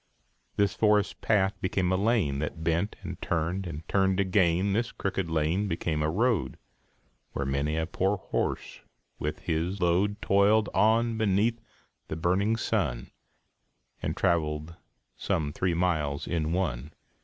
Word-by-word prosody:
This 100 Hz, -1 st, +2 dB
forest 105 Hz, -2 st, +2 dB
path 100 Hz, -2 st, +2 dB
became 95 Hz, -1 st, 0 dB
a -, -, +3 dB
lane, 95 Hz, -, +1 dB
That 80 Hz, +2 st, -4 dB
bent, 85 Hz, +5 st, 0 dB
and -, -, -7 dB
turned, 85 Hz, +3 st, -1 dB
and 80 Hz, -1 st, -7 dB
turned 95 Hz, -1 st, +2 dB
again; 95 Hz, 0 st, +2 dB
This 115 Hz, +3 st, 0 dB
crooked 95 Hz, -3 st, -3 dB
lane 80 Hz, +6 st, +1 dB
became 80 Hz, -3 st, -1 dB
a 75 Hz, -, +1 dB
road, 110 Hz, +2 st, 0 dB, 0.8 s
Where 70 Hz, -, -2 dB
many 70 Hz, +3 st, -1 dB
a 80 Hz, -, 0 dB
poor 95 Hz, +4 st, 0 dB
horse -, -, -3 dB, 0.4 s
with 75 Hz, +1 st, -3 dB
his 85 Hz, +4 st, -1 dB
load 95 Hz, +4 st, +1 dB
Toiled 100 Hz, +2 st, +3 dB
on 115 Hz, +1 st, +3 dB
beneath 110 Hz, +3 st, +1 dB, 0.5 s
the -, -, -4 dB
burning 95 Hz, +7 st, +1 dB
sun, 80 Hz, -, -1 dB, 0.9 s
And -, -, -3 dB
traveled 80 Hz, -3 st, 0 dB, 0.4 s
some 75 Hz, -2 st, -1 dB
three 90 Hz, -1 st, 0 dB
miles 80 Hz, -5 st, 0 dB
in 80 Hz, -2 st, -1 dB
one. 75 Hz, -6 st, -2 dB
90 Hz, 140 wpm, -28 LUFS, 80-100 Hz, 0.9 s, a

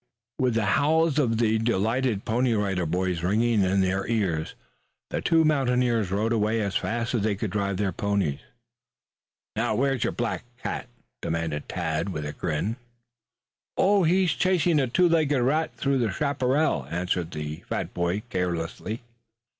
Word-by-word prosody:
With 125 Hz, -3 st, +2 dB
the 115 Hz, -2 st, +1 dB, 0.2 s
howls 160 Hz, 0 st, +3 dB
of 115 Hz, -6 st, +2 dB
the 110 Hz, -1 st, +2 dB
delighted 115 Hz, +1 st, 0 dB
Pony 120 Hz, +1 st, +1 dB
Rider 95 Hz, -5 st, 0 dB
Boys 90 Hz, +1 st, -1 dB
ringing 110 Hz, +4 st, +2 dB
in 95 Hz, +1 st, +2 dB
their 95 Hz, +1 st, 0 dB
ears 95 Hz, -9 st, -1 dB, 0.6 s
the -, -, -1 dB
two 165 Hz, -1 st, +4 dB
mountaineers 125 Hz, -7 st, +2 dB
rode 105 Hz, +4 st, 0 dB
away 110 Hz, 0 st, +1 dB
as 100 Hz, -2 st, -2 dB
fast 115 Hz, +1 st, -1 dB
as 120 Hz, -, +1 dB
they 105 Hz, 0 st, +1 dB
could 105 Hz, -1 st, -3 dB
drive 100 Hz, -1 st, -1 dB
their 100 Hz, -1 st, 0 dB
ponies. 100 Hz, -6 st, -1 dB, 1.2 s
"Now -, -, 0 dB
where's 135 Hz, -2 st, +1 dB
your -, -, 0 dB
black 120 Hz, -1 st, -2 dB, 0.2 s
cat?" -, -, -3 dB, 0.3 s
demanded 80 Hz, -3 st, -3 dB
Tad 85 Hz, +1 st, -2 dB
with 75 Hz, -5 st, -4 dB
a 75 Hz, -, -4 dB
grin. 90 Hz, +8 st, -2 dB, 1.0 s
"Oh, 200 Hz, +1 st, +4 dB
he's 180 Hz, +1 st, +3 dB
chasing 175 Hz, -3 st, +2 dB
a 135 Hz, -, +1 dB
two 175 Hz, +9 st, +3 dB
legged 155 Hz, -5 st, +2 dB
rat 155 Hz, +5 st, +1 dB
through 140 Hz, -1 st, 0 dB
the 115 Hz, -4 st, +1 dB
chaparral," 140 Hz, +2 st, 0 dB
answered 90 Hz, 0 st, -1 dB
the 75 Hz, -1 st, -5 dB
fat -, -, -3 dB
boy 90 Hz, +4 st, -1 dB
carelessly. 90 Hz, +5 st, -3 dB
110 Hz, 155 wpm, -26 LUFS, 95-130 Hz, 1.2 s, two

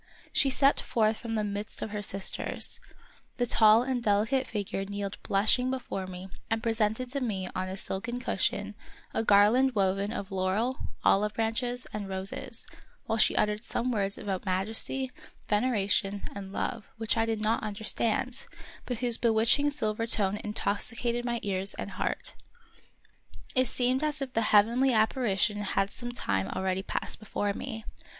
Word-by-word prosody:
She 275 Hz, -, +4 dB
stepped 275 Hz, +1 st, +4 dB
forth 220 Hz, -1 st, +1 dB
from 230 Hz, -2 st, -4 dB
the 215 Hz, -, 0 dB
midst 205 Hz, 0 st, -4 dB
of 220 Hz, -, -5 dB
her 210 Hz, -1 st, -3 dB
sisters; 195 Hz, -1 st, -2 dB, 0.6 s
the 245 Hz, -, +2 dB
tall 220 Hz, 0 st, +6 dB
and 255 Hz, -1 st, -1 dB
delicate 220 Hz, +5 st, +2 dB
figure 200 Hz, -2 st, -3 dB
kneeled 200 Hz, 0 st, -4 dB
blushing 220 Hz, +6 st, +3 dB
be 265 Hz, -, 0 dB
fore 195 Hz, -7 st, -5 dB
me 185 Hz, +1 st, -8 dB, 0.2 s
and 225 Hz, 0 st, -1 dB
presented 225 Hz, +2 st, 0 dB
to 280 Hz, -, -1 dB
me 195 Hz, -7 st, -2 dB
on 185 Hz, 0 st, -2 dB
a 190 Hz, -, -5 dB
silken 230 Hz, +6 st, -3 dB
cushion 255 Hz, -, -1 dB, 0.4 s
a -, -, 0 dB
garland 225 Hz, +5 st, +5 dB
woven 195 Hz, +1 st, +1 dB
of 200 Hz, -4 st, -5 dB
laurel, 195 Hz, +7 st, 0 dB, 0.2 s
olive 210 Hz, +2 st, +3 dB
branches, 240 Hz, +2 st, -1 dB
and 205 Hz, -2 st, -4 dB
roses, 190 Hz, +1 st, -1 dB, 0.4 s
while 225 Hz, 0 st, -1 dB
she -, -, +4 dB
uttered 210 Hz, +1 st, +1 dB
some 250 Hz, +1 st, 0 dB
words 200 Hz, -3 st, 0 dB
about 190 Hz, -3 st, -3 dB
majesty, 220 Hz, +7 st, 0 dB, 0.4 s
ven 210 Hz, 0 st, +2 dB
eration, 200 Hz, -4 st, +1 dB
and 195 Hz, -1 st, -7 dB
love, 225 Hz, +2 st, -3 dB
which 225 Hz, -1 st, 0 dB
I 225 Hz, 0 st, +1 dB
did 220 Hz, -1 st, -1 dB
not 220 Hz, +2 st, +2 dB
understand, 220 Hz, +4 st, -1 dB, 0.4 s
but 245 Hz, -, -2 dB
whose 240 Hz, -2 st, +2 dB
bewitching 230 Hz, +5 st, +3 dB
silver 225 Hz, -5 st, -1 dB
tone 205 Hz, -3 st, +3 dB
intoxicated 230 Hz, +3 st, -1 dB
my 235 Hz, -1 st, -1 dB
ear 190 Hz, -2 st, -1 dB
and -, -, -5 dB
heart. -, -, -3 dB, 1.2 s
It 255 Hz, -1 st, +3 dB
seemed 255 Hz, +4 st, +1 dB
as 305 Hz, -1 st, 0 dB
if 270 Hz, -2 st, -4 dB
the 225 Hz, -, +2 dB
heavenly 235 Hz, +6 st, +5 dB
appari 220 Hz, -2 st, +2 dB
tion 210 Hz, +1 st, +2 dB
had 195 Hz, 0 st, 0 dB
some 240 Hz, -1 st, -5 dB
time 100 Hz, -, -1 dB
already 190 Hz, -, -1 dB
passed -, -, -2 dB
before 205 Hz, -1 st, -2 dB
me. 225 Hz, -1 st, -6 dB
220 Hz, 165 wpm, -29 LUFS, 200-240 Hz, 1.2 s, tall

